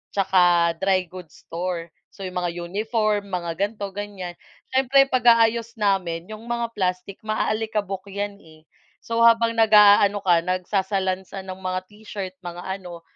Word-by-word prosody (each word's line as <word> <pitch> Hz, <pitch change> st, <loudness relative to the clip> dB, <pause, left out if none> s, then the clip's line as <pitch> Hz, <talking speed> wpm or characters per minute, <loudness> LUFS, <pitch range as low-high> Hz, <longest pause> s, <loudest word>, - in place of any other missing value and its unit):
tsaka 175 Hz, -3 st, +4 dB
dry 190 Hz, -1 st, +2 dB
goods 180 Hz, -3 st, -12 dB
store. 170 Hz, -1 st, -4 dB, 0.2 s
So, 195 Hz, -, -14 dB
yung 185 Hz, -1 st, -5 dB
mga 175 Hz, -1 st, -2 dB
uniform, 210 Hz, +3 st, -1 dB
mga 170 Hz, -2 st, -2 dB
ganito, 200 Hz, 0 st, -2 dB
ganiyan. 195 Hz, -3 st, -7 dB, 0.3 s
Siyempre, 270 Hz, +1 st, +4 dB
pag-aayos 230 Hz, -2 st, +3 dB
namin 190 Hz, -5 st, -1 dB
yung 215 Hz, +1 st, -9 dB
mga 235 Hz, -1 st, -2 dB
plastic 185 Hz, 0 st, -2 dB
maaalikabok 215 Hz, -2 st, -2 dB
'yan 200 Hz, 0 st, -4 dB
eh. 155 Hz, -3 st, -18 dB, 0.4 s
So, 230 Hz, 0 st, -2 dB
habang 230 Hz, 0 st, +4 dB
nag-aano 205 Hz, -2 st, +6 dB
ka, 175 Hz, -3 st, +4 dB
nagsasalansan 190 Hz, +1 st, -2 dB
ng 185 Hz, -, -9 dB
mga 185 Hz, 0 st, -2 dB
t-shirt, 205 Hz, -3 st, -7 dB
mga 175 Hz, -1 st, -8 dB, 0.2 s
ano, 175 Hz, -2 st, -10 dB
195 Hz, 135 wpm, -23 LUFS, 180-215 Hz, 0.4 s, nag-aano